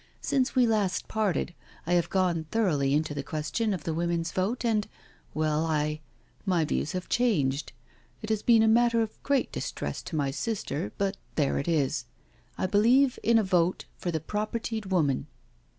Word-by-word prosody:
Since 265 0 +1
we 250 -1 +5
last 210 -5 0
parted 205 -5 0 0.3
I 175 - 0
have 170 -1 +2
gone 175 -4 +1
thoroughly 150 -11 +2
into 155 0 0
the 145 - -3
question 155 +10 -2
of 180 -6 -3
the 165 - -2
women's 170 0 -1
vote, 205 +9 -1
and 215 -3 +1 0.2
— - - -32
well, 155 0 +1
I—my 155 +3 -2
views 150 - -1
have 185 0 -4
changed 155 - +1 0.3
— - - -34
it 215 - -3
has 215 -1 +1
been 230 -1 +5
a - - +4
matter 230 0 +4
of 220 - -8
great 280 -2 +1
distress - - -4
to 165 - -6
my 140 -3 0
sister, 145 - -3
but 195 0 -1 0.2
there 145 -3 +1
it 140 - -4
is 145 -5 +1 0.3
— - - -34
I - - 0
believe 240 +7 +4
in 230 +2 +4
a 220 - +4
vote 180 -2 +1
for 180 - -4
the 160 -2 -1
propertied 215 +4 -3
woman." 150 -7 +1
185 Hz, 180 wpm, -28 LUFS, 155-220 Hz, 0.3 s, we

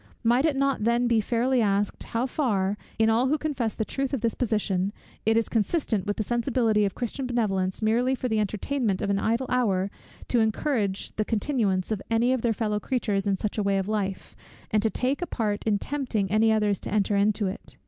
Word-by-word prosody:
Might 240 +5 +3
it 310 -3 +2
not 275 -4 +1
then 235 +2 +2
be 230 -2 +3
fairly 240 +3 +1
asked, 200 -1 0
how 230 +2 -1
far, 205 -8 0 0.2
in 220 - +3
all 230 +3 +3
who 300 +4 +2
confess 270 -8 -2
the 220 - -1
truth 275 +3 -2
of 250 - -4
this 230 -1 +1
position, 205 -5 0 0.4
it 225 0 +4
is 230 - +1
consistent 225 - 0
with 205 - -1
the 215 - 0
sensibility 235 -2 +1
of 195 - -2
Christian 255 +2 -3
benevolence, 195 -5 0
merely 240 +4 +2
for 255 - -3
the 220 -2 +1
entertainment 215 +1 -1
of 200 - 0
an 200 - +1
idle 230 +5 0
hour, 200 -6 +1 0.4
to 245 - +3
encourage 220 -3 -1
the 215 - +2
continuance 215 -5 0
of 210 -3 -1
any 235 +3 +3
of 260 - -1
their 235 - +1
fellow 210 -1 -1
creatures 210 -5 -1
in 195 -1 +1
such 210 +2 -3
a - - +1
way 200 0 +2
of 190 0 -1
life, 200 -3 -3 0.4
and 215 - +3
to 220 - +2
take 260 +7 -1
a 350 - -2
part 210 -3 -2
in 215 -2 +2
tempting 230 -7 -2
any 220 +1 +4
others 210 -3 +2
to - - -7
enter 205 0 +1
into 205 +1 +2
it? 190 +2 -6
220 Hz, 215 wpm, -26 LUFS, 205-245 Hz, 0.4 s, it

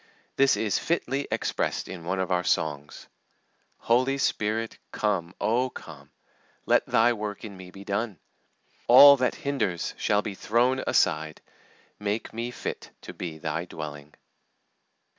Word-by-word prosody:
This 135 0 +4
is 105 -3 0
fitly 140 -4 -1
expressed - - -1
in 90 -3 -8
one 95 +2 -1
of 95 0 -2
our 90 0 +1
songs: 75 -4 -2 0.7
"Holy 130 +4 +2
Spirit, 110 -3 -1
come, 95 -5 -1
Oh, 120 +5 +1
come! 70 - -12 0.6
Let - - +3
Thy 120 +2 +4
work 105 -1 -5
in 100 -2 -9
me 95 -1 -11
be 100 +2 -12
done! 100 0 -2 0.7
All 140 0 +10
that 125 -1 0
hinders 110 - -1
shall 105 0 +1
be 105 - -4
thrown 125 +6 +1
aside; 80 -3 +1 0.6
Make 105 +2 -3
me 115 +2 -3
fit 125 - -6
to - - -8
be 80 -3 -6
Thy 80 +2 -3
dwelling." 75 -3 -8
105 Hz, 140 wpm, -26 LUFS, 85-120 Hz, 0.7 s, All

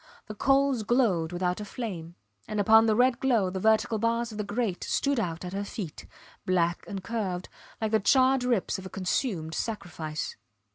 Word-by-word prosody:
The 215 - -7
coals 270 +2 +2
glowed 210 -8 +2
without 180 +2 -1
a - - -3
flame; 185 -7 -6 0.3
and 215 - -3
upon 220 +2 +6
the 215 - +3
red 250 +1 +3
glow 230 -8 +2
the 190 - -3
vertical 220 +1 +2
bars 230 +1 0
of 215 - -8
the - - 0
grate 205 -2 -2
stood 280 -3 0
out 170 -4 -3
at 180 - -6
her 200 +1 -2
feet, 200 -6 -7 0.4
black 175 -2 +1
and 195 -2 -5
curved, 190 -5 -3 0.3
like 220 -2 -1
the 220 - +4
charred 260 +4 +4
ribs 235 -7 0
of 190 - -8
a - - -10
consumed 185 - -2
sacrifice. 165 -7 -4
210 Hz, 185 wpm, -28 LUFS, 180-235 Hz, 0.4 s, upon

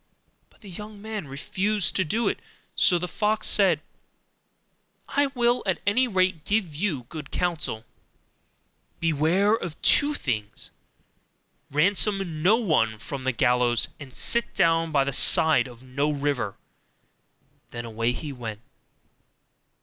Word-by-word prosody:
But - - -28
the 205 - -12
young 210 +3 -9
man 210 -5 -6
refused 185 +7 0
to 190 - +2
do 220 +8 -1
it: - - -1 0.4
so 180 - +4
the 180 +1 -3
fox 215 +4 0
said, 185 -7 +4 1.3
'I 285 0 +2
will 240 0 +2
at 190 - +1
any 250 +6 +3
rate 185 -6 0
give 200 -6 -1
you 150 -5 -2
good 155 +5 -9
counsel: 155 -10 -2 1.1
beware 165 +6 +2
of 175 -8 -3
two 295 0 +4
things; 110 - -2 1.0
ransom 190 +1 +1
no 190 +7 +5
one 155 - +1
from 130 +4 -7
the 130 - +2
gallows, 120 -1 +2
and 140 -3 -10
sit 235 0 0
down 165 -2 +2
by 140 -2 +3
the 140 0 -3
side 150 -2 +5
of 120 0 -13
no 140 +3 -1
river.' 140 -8 -2 1.1
Then 120 0 -7
away 115 +1 -1
he 145 +3 -6
went. 115 -4 -7
160 Hz, 135 wpm, -25 LUFS, 130-205 Hz, 1.3 s, no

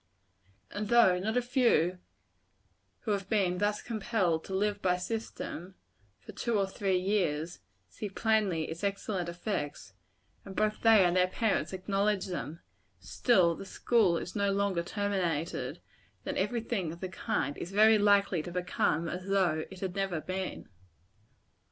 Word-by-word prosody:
And 205 +1 -3
though 225 -7 +5
not 220 +5 -1
a 250 - +2
few 235 - +2 1.0
who 220 - -2
have 195 -1 -2
been 185 -5 +1
thus 205 +1 0
compelled 205 -7 0
to 190 - -4
live 205 +1 0
by 180 -1 +2
system, 190 -2 -5 0.4
for - - -12
two 235 -3 -1
or 200 - +2
three 195 -1 0
years, 175 -4 -1 0.3
see 210 - -6
plainly 205 -5 +1
its 165 +4 -6
excellent 195 -3 -2
effects, 170 - -4 0.5
and 195 -1 -10
both 215 0 0
they 220 -4 +6
and 175 0 +2
their 180 0 +4
parents 220 +3 0
acknowledge 195 +1 0
them, 170 -3 -5 0.4
still 170 - +3
the 165 - -8
school 195 -3 +2
is 180 - -6
no 200 -1 +1
sooner 200 -4 +1
terminated, 175 -4 -2 0.4
than - - -3
every 240 -2 0
thing 200 -8 -2
of 170 - -9
the 185 - -3
kind 145 -5 -2
is 175 - -6
very 215 +2 +6
likely 200 -4 +3
to 175 - -7
become 175 -2 0
as 180 +3 -5
though 180 -6 +1
it 190 -1 -11
had 185 -2 -3
never 195 -4 -1
been. 185 +3 -5
190 Hz, 155 wpm, -30 LUFS, 175-210 Hz, 1.0 s, they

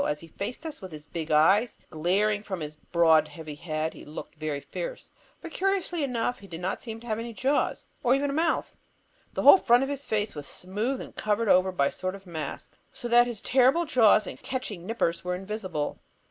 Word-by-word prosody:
As 150 0 -2
he 165 - -11
faced 235 - -5
us 315 -2 -5
with 190 -2 -8
his 150 -1 -9
big 160 0 -5
eyes 190 +10 +4
glaring 195 +6 +1
from 190 -3 -5
his 150 0 -5
broad 160 -1 +3
heavy 155 0 -8
head, 155 +1 -3
he - - -11
looked 150 +2 -8
very 155 -2 -3
fierce. - - -6 0.3
But - - -8
curiously 375 -4 0
enough, 245 -2 -1
he 200 - -13
didn't 175 +1 -3
seem 225 -2 -7
to - - -13
have 220 -2 -2
any 230 0 -5
jaws; 270 +6 0 0.2
nor 250 0 +4
even 280 +1 0
a - - -3
mouth. 325 +2 0 0.6
The - - -2
whole 385 - +10
front 245 -3 +4
of 270 - -2
his 285 0 -4
face 210 -1 0
was 145 -2 -7
smooth 210 +9 -3
and - - -10
covered 215 +1 0
over 185 0 +5
by 160 -6 +1
a - - +1
sort 185 +1 -4
of 195 0 -13
mask, 160 -5 -6
so 240 - -6
that 240 +1 +6
his 235 -4 -2
terrible 265 +6 +4
jaws 230 -8 +5
and - - -8
catching 215 -9 -4
nippers 195 -7 0
were 180 0 -1
invisible. 185 -5 -4
205 Hz, 215 wpm, -27 LUFS, 165-245 Hz, 0.6 s, whole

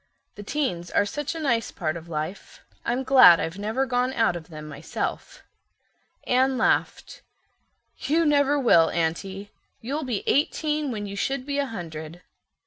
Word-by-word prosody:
"The 205 - -10
teens 200 - -2
are 205 - +2
such 295 +9 -4
a - - -4
nice 235 -7 0
part 155 -3 -3
of 170 0 -9
life. 160 +4 -6 0.2
I'm 245 +3 -1
glad 255 -11 +8
I've 165 +4 -4
never 220 +6 -1
gone 250 0 0
out 225 -8 +2
of 170 0 -8
them 155 -2 -9
myself." 150 0 -5 0.8
Anne 260 +1 +2
laughed. - - 0 0.8
"You 320 +5 +1
never 290 -1 +3
will, 170 - +5
Aunty. 190 +5 -3 0.3
You'll 275 +7 -3
be 245 -6 -3
eighteen 300 0 0
when 210 -4 -4
you 200 0 -6
should 270 +5 -2
be 285 0 -2
a 280 - 0
hundred. 165 -5 -8
225 Hz, 155 wpm, -25 LUFS, 170-275 Hz, 0.8 s, glad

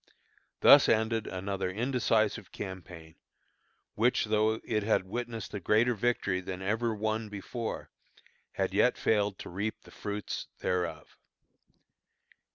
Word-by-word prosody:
Thus - - +8
ended 110 0 +1
another 95 0 -3
indecisive 115 -2 0
campaign, 90 -4 -8 0.8
which 120 +2 +2
though 110 +1 +2
it 110 -1 0
had 105 -2 +2
witnessed 115 +1 -5
a 105 - -3
greater 110 +6 +3
victory 105 -4 0
than 95 0 -6
ever 115 +4 0
won 110 +1 -2
before, 110 +3 -5 0.7
yet - - 0
had - - +3
failed 105 -3 +1
to - - -8
reap 100 +5 -3
the - - -16
fruits 105 -2 -5
thereof. 85 -4 -2
105 Hz, 120 wpm, -30 LUFS, 95-115 Hz, 0.8 s, Thus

